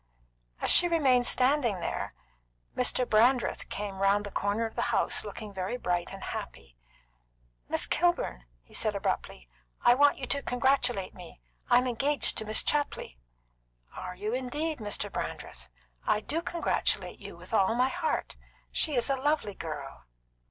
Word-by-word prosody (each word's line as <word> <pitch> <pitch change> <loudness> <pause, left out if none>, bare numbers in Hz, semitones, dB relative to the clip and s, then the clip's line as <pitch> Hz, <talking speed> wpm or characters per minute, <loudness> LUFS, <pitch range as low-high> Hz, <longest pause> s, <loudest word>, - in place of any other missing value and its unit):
As - - +3
she 350 - +6
remained 265 -8 +3
standing 255 -6 +2
there, - - -4 0.6
Mr. 250 0 +2
Brandreth 240 +3 +2
came 200 -2 -5
round 200 +1 +3
the 205 - -7
corner 205 +4 0
of 225 - -5
the - - -1
house, - - +2
looking 215 -3 -8
very 190 +5 -3
bright 175 -6 -1
and 195 0 -8
happy. - - -7 0.9
"Miss - - +2
Kilburn," 335 - 0 0.2
he - - -22
said - - 0
abruptly, - - -3 0.4
"I 240 - +8
want 285 +3 +4
you 265 - -4
to 280 +3 -1
congratulate 245 -6 +1
me. 180 -2 -12 0.3
I'm 245 +1 +5
engaged 275 +4 +3
to 220 - -3
Miss 215 +1 +3
Chapley." 290 - -2 0.8
"Are 180 0 -6
you 210 +4 -3
indeed, 290 +4 -2
Mr. 210 -2 -2
Brandreth? - - -6 0.4
I - - +3
do 310 +9 -2
congratulate 340 0 0
you - - -10
with - - -13
all 220 +1 +3
my 250 +2 +3
heart. 475 - -2 0.4
She 305 -4 0
is 240 - +2
a 275 - +2
lovely 275 -5 0
girl." 150 -6 -7
240 Hz, 155 wpm, -29 LUFS, 195-275 Hz, 0.9 s, I